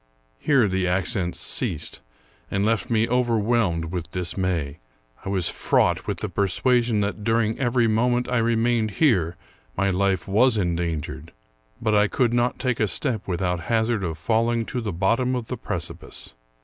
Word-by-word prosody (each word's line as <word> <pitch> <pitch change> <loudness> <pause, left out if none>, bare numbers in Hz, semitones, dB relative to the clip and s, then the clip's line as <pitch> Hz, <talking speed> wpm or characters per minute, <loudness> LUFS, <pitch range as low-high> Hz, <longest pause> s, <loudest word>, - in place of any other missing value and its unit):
Here 135 -7 +3
the 95 -1 0
accents 90 0 -1
ceased, - - -2 0.5
and 100 +1 0
left 115 0 0
me 115 -1 +2
overwhelmed 115 -8 +1
with 85 -3 -4
dismay, 90 -5 -2 0.4
I - - -5
was 95 -3 +1
fraught - - +1
with - - -3
the - - -1
persuasion 110 +3 +1
that 100 +1 -3
during 115 0 +1
every 120 -2 +2
moment 120 +3 +1
I 125 -1 +1
remained 115 -1 +1
here 90 - +2 0.4
my 100 +1 +2
life 95 -1 0
was 110 +4 +3
endangered; 85 -4 -3 0.5
but 110 -1 0
I 105 0 +4
could 120 +1 +1
not 120 0 +1
take 125 -3 -1
a 110 - +2
step 115 - -2
without 90 -1 -1
hazard 110 -2 +1
of 80 -3 -3
falling 115 +5 +1
to 125 - -1
the 110 -3 -3
bot 95 +7 +1
tom 130 0 0
of 120 -3 -4
the - - -3
precipice. - - -6
110 Hz, 160 wpm, -24 LUFS, 95-120 Hz, 0.5 s, I